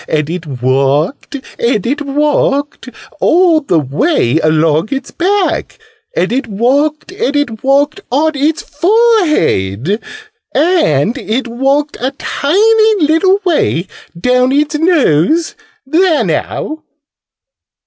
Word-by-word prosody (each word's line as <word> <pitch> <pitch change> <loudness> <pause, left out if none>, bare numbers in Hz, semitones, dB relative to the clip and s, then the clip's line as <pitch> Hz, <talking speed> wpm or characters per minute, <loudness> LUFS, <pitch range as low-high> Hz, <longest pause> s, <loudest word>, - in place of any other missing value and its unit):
And 155 0 -1
it 175 -2 -5
walked 135 - -1 0.2
and 235 -5 0
it 285 +5 -1
walked 285 0 -1 0.3
all 340 -2 +3
the 185 - 0
way 150 - 0
along 155 +3 +1
its 275 0 -4
back. 385 +2 -1 0.4
And 185 +4 0
it 260 0 -1
walked 280 - 0
and 385 -7 -2
it 245 -7 -2
walked 285 +6 +1
on 305 +5 +2
its 305 +4 0
forehead. 300 - +1 0.5
And 295 - +2
it 240 +3 -2
walked 275 +5 -1
a 255 - -1
tiny 435 +6 +2
little 375 +6 +2
way 295 - +1 0.3
down 250 +5 +2
its 295 +2 +1
nose! 315 - +2 0.3
There 325 +3 +2
now!" 315 0 -3
280 Hz, 110 wpm, -13 LUFS, 195-320 Hz, 0.5 s, all